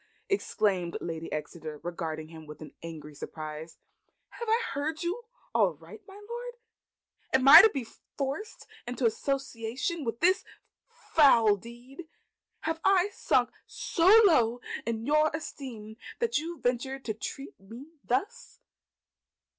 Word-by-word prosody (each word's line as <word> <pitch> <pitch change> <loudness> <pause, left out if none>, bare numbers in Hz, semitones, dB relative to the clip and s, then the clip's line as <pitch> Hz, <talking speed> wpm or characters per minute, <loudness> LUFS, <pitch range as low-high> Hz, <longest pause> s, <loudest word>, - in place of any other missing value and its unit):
exclaimed 200 - 0
Lady 165 -1 -5
Exeter, 155 0 -6
regarding 160 -3 -5
him 160 -1 -12
with 150 0 -10 0.2
angry 155 -3 -8
surprise. 155 +2 -8 0.5
"Have 470 - -7
I 450 +1 +4
heard 305 +4 -3
you 390 +8 -3 0.3
aright, 185 -3 -1
my 390 - -13
Lord? 480 +1 -6 0.8
Am 265 0 +3
I 310 +4 +13
to 445 - +6
be 270 - -4 0.3
forced 280 +10 -4 0.2
into 245 +1 -2
association 260 +4 -2
in 235 -6 -3
this 370 +3 +3 0.7
foul 235 -9 +6
deed? 240 - -12 0.5
Have 320 +1 -2
I 390 +1 +3
sunk - - +1 0.2
so 335 0 -1 0.2
low 245 - +4 0.3
in 230 -1 -2
your 305 +2 +3
esteem 230 -8 -8 0.2
that 470 -7 +1
you 330 +2 -6
venture 250 +2 -1
to 245 -5 -4
treat 270 +6 -7
me 235 +10 -12
thus?" 410 - -3
245 Hz, 125 wpm, -29 LUFS, 190-320 Hz, 0.8 s, I